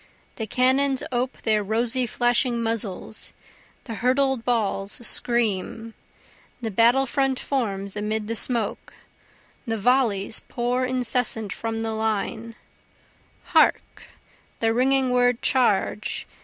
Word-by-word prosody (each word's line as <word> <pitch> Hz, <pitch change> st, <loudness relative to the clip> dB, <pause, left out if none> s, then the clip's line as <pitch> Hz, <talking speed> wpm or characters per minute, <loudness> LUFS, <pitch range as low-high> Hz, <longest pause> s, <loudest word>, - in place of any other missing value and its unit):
The 220 Hz, -, -4 dB
cannons 260 Hz, +3 st, +2 dB
ope 250 Hz, +1 st, -2 dB
their 215 Hz, -1 st, +2 dB
rosy 235 Hz, +4 st, 0 dB
flashing 240 Hz, +1 st, +1 dB
muzzles 220 Hz, -2 st, -3 dB, 0.5 s
the 230 Hz, -, -6 dB
hurtled 255 Hz, +2 st, +1 dB
balls 210 Hz, -4 st, 0 dB
scream, 225 Hz, -1 st, 0 dB, 0.7 s
The 225 Hz, -3 st, -4 dB
battle 235 Hz, +6 st, +4 dB
front 270 Hz, 0 st, 0 dB
forms 200 Hz, -7 st, -2 dB
amid 210 Hz, +1 st, -2 dB
the 230 Hz, -, -2 dB
smoke 230 Hz, -2 st, -2 dB, 0.7 s
the 225 Hz, 0 st, -1 dB
volleys 220 Hz, -3 st, +1 dB
pour 245 Hz, +1 st, -1 dB
incessant 245 Hz, -4 st, 0 dB
from 225 Hz, 0 st, -3 dB
the 225 Hz, -, -2 dB
line, 220 Hz, +1 st, -2 dB, 1.0 s
Hark, -, -, +2 dB, 0.5 s
the 225 Hz, 0 st, +2 dB
ringing 260 Hz, +1 st, +2 dB
word 245 Hz, -1 st, +2 dB
Charge! 215 Hz, -4 st, +1 dB
230 Hz, 110 wpm, -24 LUFS, 220-250 Hz, 1.0 s, battle